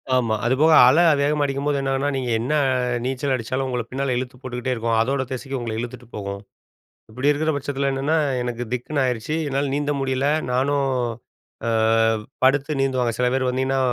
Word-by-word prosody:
ஆமா, 115 -3 +1
அதுபோக 140 +6 +3 0.2
அல 150 +6 +5 0.2
வேகமா 145 +1 +1
அடிக்கும்போது 140 +1 -1
என்னன்னா, 135 +1 0
நீங்க 130 -2 -2
என்னா 150 +6 0 0.5
நீச்சல் 135 +1 -1
அடிச்சாலும், 130 +2 -2
உங்கள 125 -1 -2
பின்னால 135 0 -1
இழுத்து 125 0 -4
போட்டுக்கிட்டே 130 0 -4
இருக்கும். 115 0 0
அதோட 130 +2 0
திசைக்கு 135 +1 -4
உங்கள 115 -2 -4
இழுத்துட்டு 120 0 -7
போகும். 100 -1 -5 0.7
இப்டி 130 +6 0
இருக்கிற 155 +2 0
பட்சத்துல 140 0 -2
என்னன்னா, 145 +4 0 0.3
எனக்கு 120 0 -3
திக்குன்னு 135 +4 -2
ஆயிருச்சு. 125 +5 -2
என்னால 140 0 -1
நீந்த 145 0 0
முடியல, 130 +1 0 0.2
நானும் 135 +2 +1 0.8
ஆ, - - +1 0.7
படுத்து 140 +2 +2
நீந்துவாங்க. 130 -3 +1
சில 125 - +3
பேரு 130 -1 0
வந்திங்கன்னா 130 +1 0
130 Hz, 160 wpm, -22 LUFS, 125-140 Hz, 0.8 s, அல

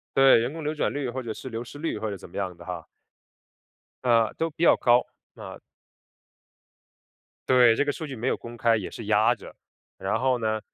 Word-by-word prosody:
对， 135 -3 +7
员 125 +5 -2
工 165 -1 -7
流 150 +1 -2
转 - - -1
率 140 -3 -3
或 130 +2 -4
者 115 -2 -4
是 130 - -8
流 115 0 -5
失 145 +5 -11
率， 160 -8 -3
或 110 0 -3
者 100 - -5
怎 - - -12
么 - - -13
样 95 -3 -3
的 - - -13
哈。 85 -4 -6 1.2
呃， 115 -3 +3
都 165 0 -2
比 155 - -8
较 - - +6
高， 120 0 +3 0.3
啊。 - - -9 1.9
对， 125 -3 +6
这 145 - +1
个 145 - 0
数 160 - -6
据 135 - -7
没 120 +3 -2
有 - - +1
公 120 0 -10
开 115 0 +3
也 100 - -4
是 115 - -8
压 105 0 +4
着。 - - -13 0.4
然 - - -1
后 130 -1 +2
呢， 110 -1 -1
120 Hz, 230 characters per minute, -26 LUFS, 110-135 Hz, 1.9 s, 对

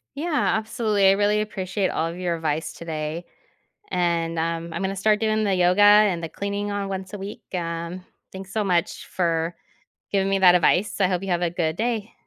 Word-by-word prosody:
Yeah. 305 +1 0
Absolutely. 215 -2 +1
I - - +7
really 205 +1 +2
appreciate 195 -2 -2
all 165 - -1
of 170 +1 -6
your 180 -2 -1
advice 160 -1 -2
today, 160 0 -5 0.7
and, 170 -2 0
um, 165 +1 -2
I'm 170 +3 -4
gonna 195 +1 -2
start 210 +2 +2
doing 215 -1 +1
the 200 -2 +1
yoga 180 +2 +3
and 205 -4 +6
the 165 - -4
cleaning 200 +3 -4
on 200 -1 -3
once 190 0 -5
a 205 - -6
week, 195 +2 -7
um, 170 +1 -4 0.3
thanks 190 0 -9
so 215 0 0
much 175 -3 -1
for 165 -1 -1 0.6
giving 195 -1 +1
me 195 0 +1
that 180 -2 +7
advice. 180 +4 +2
I 190 - +5
hope 180 0 -1
you 195 - -4
have 175 -1 0
a 175 - +1
good 165 -2 -1
day. 225 0 -2
185 Hz, 200 wpm, -24 LUFS, 170-205 Hz, 0.7 s, I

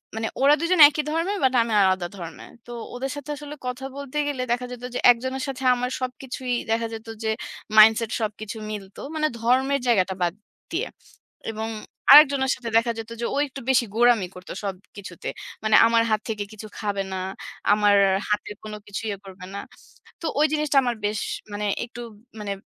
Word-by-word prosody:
মানে 225 0 -2
ওরা 285 +2 +6
২ 335 - -1
জন 365 - +3
একই 300 0 -2
ধর্মের। 340 +6 0
বাট 260 -1 +4
আমি 230 -1 -3
আলাদা 185 -2 +2
ধর্মের। 170 -2 -9
তো 240 - -10 0.2
ওদের 265 +2 -3
সাথে 290 0 -8
আসলে 295 +1 -8
কথা 250 +2 -4
বলতে 280 +1 -6
গেলে 270 -3 -2
দেখা 245 +1 0
যেত 245 0 -8
যে - - -2
একজনের 260 +2 -2
সাথে 265 -1 -5
আমার 250 +1 -2
সবকিছুই 255 0 -4 0.2
দেখা 230 0 +1
যেত 225 +1 -8 0.2
যে 220 - 0 0.5
মাইন্ডসেট 220 +1 +7
সবকিছু 215 0 -4
মিলতো। 195 -2 -8
মানে 305 0 +2
ধর্মের 260 +4 +2
জায়গাটা 190 -5 +3
বাদ 175 -1 +1 0.4
দিয়ে। 360 +9 -1 0.6
এবং 220 0 -4 0.4
আরেকজনের 280 -2 +8
সাথে 235 -2 -6
দেখা 235 +1 +2
যেত 225 0 -7
যে - - 0
ও - - -1
একটু 270 0 -9
বেশি 245 -2 +4
গোরামি 235 -5 +4
করতো 180 +1 -9
সবকিছুতে। 195 -1 -7 0.3
মানে 215 0 +4
আমার 230 0 +4
হাত 215 -1 +1
থেকে 210 -2 -2
কিছু 215 0 -9
খাবে 200 -2 -1
না। 185 - -2 0.5
আমার 205 -1 +4 0.3
হাতের 210 0 -1
কোন 215 - -7
কিছু 205 - -5
ইয়ে 205 -2 -3
করবে 185 -1 -10
না। 200 - -4 0.6
তো 330 - -5
ওই 305 - +6
জিনিসটা 300 -2 +1
আমার 245 -1 0
বেশ 210 0 -1 0.3
মানে 210 +1 -3 0.2
একটু 240 0 -10 0.4
মানে 205 -1 -4
235 Hz, 185 wpm, -24 LUFS, 210-265 Hz, 0.6 s, আরেকজনের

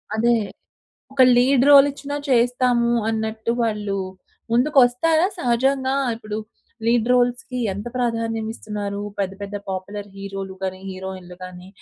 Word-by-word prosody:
అదే. 235 +2 +3 0.8
ఒక 270 - +4
lead 255 +1 +4
role 285 -1 +9
ఇచ్చినా 285 +1 -6
చేస్తాము 245 -1 +2 0.2
అన్నట్టు 220 0 -2
వాళ్ళు 210 -3 -1 0.5
ముందుకు 275 +5 +3
వస్తారా? 315 +8 +2
సహజంగా 265 +1 +1 0.2
ఇప్పుడు 215 -2 -6 0.5
లీడ్ 235 -1 +3
రోల్స్‌కి 245 +1 +1
ఎంత 205 +4 -6
ప్రాధాన్యం 230 -2 -1
ఇస్తున్నారు 205 -2 -5 0.2
పెద్ద, 195 -1 -1
పెద్ద 205 +1 -5
పాపులర్ 200 +2 -5
హీరోలు 195 -1 -6
గాని, 185 0 -3
హీరోయిన్‌లు 185 -1 -8
గాని 185 0 -10
230 Hz, 120 wpm, -22 LUFS, 200-250 Hz, 0.8 s, role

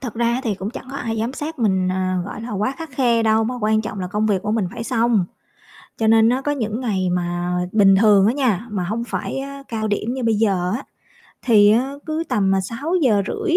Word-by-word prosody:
Thật 245 -5 -6
ra 235 +1 0
á 255 - -1
thì 215 - 0
cũng 195 +2 -5
chẳng 255 - -9
có 275 - -6
ai 225 -4 -3
giám 230 +4 -2
sát 300 +2 -6
mình, 190 -5 +1
à, 185 0 -1
gọi 205 - -7
là, 230 +2 -7
quá 210 +7 -1
khắt 325 - -6
khe 245 -3 +2
đâu 220 0 +3
mà 250 - -2
quan 215 +1 +2
trọng 210 -2 -5
là 180 - -3
công 210 +3 -1
việc 195 -3 +1
của 210 - -2
mình 220 -4 0
phải 230 - -6
xong. 230 -5 +2 0.7
Cho 220 - 0
nên 225 0 +5
á 255 +2 0
có 290 +2 -1
những 225 -5 -2
ngày 190 -7 -1
mà 175 0 -1 0.2
bình 195 -3 +5
thường 200 -1 +5
á 230 - +2
nha, 240 -6 0
mà 190 -4 -2
hông 220 +6 -2
phải - - -4
á 275 +1 -6
cao 220 -2 -3
điểm 210 +3 -1
như 260 -1 -4
bây 225 -2 +2
giờ 195 -4 +1
á 260 - -5 0.6
thì 210 -4 +6
á 250 +5 +2
cứ 315 +1 -2
tầm, 195 -2 +2
à, 190 - +2
6:30, 280 - 0
220 Hz, 245 wpm, -21 LUFS, 200-250 Hz, 0.7 s, thì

